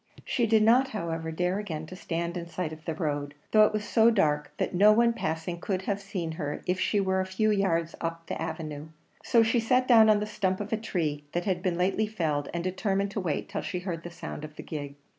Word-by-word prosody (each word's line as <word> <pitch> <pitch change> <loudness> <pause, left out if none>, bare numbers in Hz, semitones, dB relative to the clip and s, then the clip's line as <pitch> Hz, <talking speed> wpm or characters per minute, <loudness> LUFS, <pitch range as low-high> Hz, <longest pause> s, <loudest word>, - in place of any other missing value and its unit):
She 240 -2 +1
did 220 -1 +4
not, 245 +4 +5
however, 165 -8 -4
dare 180 +4 0
again 160 -7 -5
to 185 - -9
stand 170 -1 -3
in 170 -1 -4
sight 170 -2 -4
of 155 +1 -12
the 160 - -2
road, 145 -3 -2 0.2
though 215 -1 +7
it - - -3
was 215 -1 -3
so 225 0 +5
dark, 150 -9 +1
that - - -1
no 205 +4 +6
one 235 +2 +4
passing 165 -2 -3
could 190 -2 -2
have 200 +1 -2
seen 190 -5 -4
her 150 -2 -4
if 180 +1 0
she 205 - +1
were 190 -1 +1
a - - -2
few 215 +3 +1
yards 170 -5 +1
up 165 0 -4
the - - -5
avenue; 155 -2 -5 0.4
so 230 -3 +4
she 225 +2 +2
sat 250 +3 +2
down 225 -3 +7
on 210 -1 +5
the 210 - -1
stump 190 -3 -1
of 205 +1 -4
a - - +4
tree 155 -9 -2
that 175 0 -1
had 185 -3 0
been 180 -2 0
lately 195 +4 +1
felled, 155 -9 -1
and 170 +1 -3
determined 195 +2 -1
to 205 - -3
wait 165 -6 -2
till 200 - -3
she 180 - -4
heard 175 -3 -4
the 175 - -7
sound 170 -3 -7
of 155 0 -8
the - - -8
gig. 145 -2 -6
185 Hz, 245 wpm, -28 LUFS, 165-210 Hz, 0.4 s, though